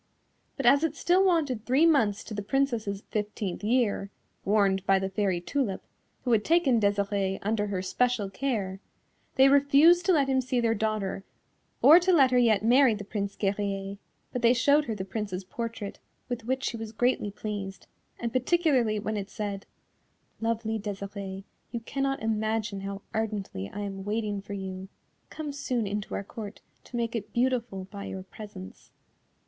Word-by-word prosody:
But 275 - -3
as 280 +5 +6
it 315 -2 0
still 360 +4 +3
wanted 305 - +1
three 265 +7 +3
months 230 -11 +3
to - - -8
the 205 - -3
Princess's 220 -4 -1
fifteenth 210 -3 -3
year, 215 -3 +1 0.3
warned 195 -2 +2
by 195 - +5
the 190 0 -2
Fairy 190 -3 0
Tulip, 205 +1 -2 0.4
who 250 - 0
had 220 -2 +4
taken 300 -8 +3
Desirée 200 -1 +1
under 210 0 0
her 190 -2 -2
special 245 0 +1
care, 195 -4 -2 0.6
they 265 +1 +7
refused 285 +5 +6
to - - +6
let 290 -6 +3
him 265 -1 +2
see 255 0 -1
their 230 -1 +2
daughter 215 -3 -2 0.6
or 320 +4 +10
to 365 +1 +2
let 275 -7 +5
her 250 - +4
yet 220 -3 +3
marry 250 0 +5
the 205 - -6
Prince 200 -1 -3
Guerrier, 195 -1 -2 0.4
but 250 - -2
they 235 +1 +5
showed 285 +4 +4
her 225 - -3
the 190 -2 -5
Prince's 195 -2 -4
portrait, 225 +1 -5 0.3
with 240 -2 -4
which 260 +2 -1
she 235 - -2
was 225 -1 -6
greatly 245 -2 +1
pleased, 200 -1 -6 0.3
and 235 -1 -3
particularly 255 -5 +2
when 215 +1 -2
it 200 0 -4
said, 205 -2 -5 0.7
"Lovely 225 -1 -1
Desirée, 200 -1 -6 0.3
you 235 - -3
cannot 270 +2 -2
imagine 215 -2 -1
how 195 0 -6
ardently 205 - -3
I 205 - -6
am 195 -1 -5
waiting 210 -1 -2
for 200 0 -8
you; 190 -1 -6 0.4
come 305 -2 -5
soon 255 -5 -2
into 205 0 -3
our - - -3
Court 210 0 -8 0.3
to - - -10
make 235 0 -1
it 225 - -4
beautiful 235 -6 0
by 200 -1 -7
your 190 -1 -6
presence." 190 - -11
215 Hz, 170 wpm, -28 LUFS, 200-255 Hz, 0.7 s, or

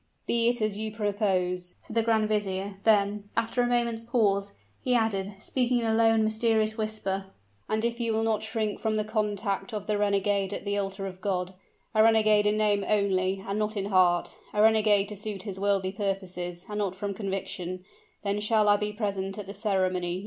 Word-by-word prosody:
"Be 235 0 +3
it 240 -2 0
as 210 -1 -1
you 215 0 -2
propose," 190 -4 -1
said 220 - -11
the 230 - +4
grand 220 -1 +2
vizier; 200 -2 -1
then, 205 -1 +2
after 230 +2 +1
a 245 - +2
moment's 235 -2 0
pause, 200 -4 +1 0.3
he 250 -1 +3
added, 205 -4 0
speaking 245 +3 0
in 235 - 0
a 220 - +2
low 225 0 +5
and 225 -1 +3
mysterious 220 0 +2
whisper: 215 -3 -2 0.4
"and 220 +1 0
if 235 0 -1
you 230 -1 0
will 220 0 +1
not 220 -1 +1
shrink 220 -1 -2
from 220 -1 0
the 215 - +1
contact 210 -1 -2
of 205 -1 -4
the 210 -1 0
renegade 200 -1 +1
at - - -7
the 200 0 -1
altar 195 -1 -3
of 185 -1 -7
God 185 -2 -2 0.4
a 215 - +4
renegade 215 -2 +5
in 210 +1 +2
name 205 -2 +2
only, 195 -2 +1
and 200 +2 -1
not 215 0 -1
in 200 0 -2
heart 180 -2 +3 0.2
a 210 - +2
renegade 215 -2 +4
to 210 - -6
suit 205 -1 -5
his 195 -3 -5
worldly 195 -1 +1
purposes, 185 -3 -3
and 210 0 -4
not 195 -3 -1
from 200 +1 -3
conviction 185 -2 -4 0.4
then 200 0 0
shall 210 0 +2
I 205 - +5
be 210 0 -2
present 200 -2 -3
at 205 - -5
the 200 - -7
ceremony. 185 -4 0
210 Hz, 200 wpm, -27 LUFS, 195-220 Hz, 0.4 s, low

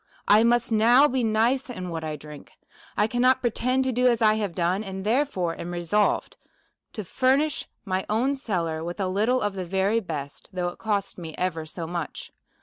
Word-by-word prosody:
1 215 +3 +6
must 240 0 +2
now 235 +6 +6
be 260 -2 -1
nice 230 +5 +1
in 185 -7 -5
what 165 -1 -4
I 155 -1 -3
drink; 150 0 -12 0.4
1 210 - +2
cannot 255 +2 +3
pretend 255 +2 0
to 260 - 0
do 250 +1 +2
as 235 -2 +3
I 215 -1 +5
have 205 -5 -2
done; 180 +4 0
and, 190 -1 -6
therefore, 215 - 0
am 170 - -5
resolved 175 +4 0 0.6
to 215 - -5
furnish 270 - +1 0.2
my 190 -1 -2
own 240 +6 +1
cellar 170 - -2
with 175 +4 -5
a 190 - 0
little 220 +7 +1
of 205 -1 -1
the 190 -1 -4
very 190 +5 +1
best, 150 -8 -7
though 180 -1 -2
it 175 - -12
cost 205 -4 -2
me 160 -2 -7
ever 165 -3 -2
so 165 +1 -6
much. 170 -1 -5
205 Hz, 195 wpm, -25 LUFS, 175-240 Hz, 0.6 s, 1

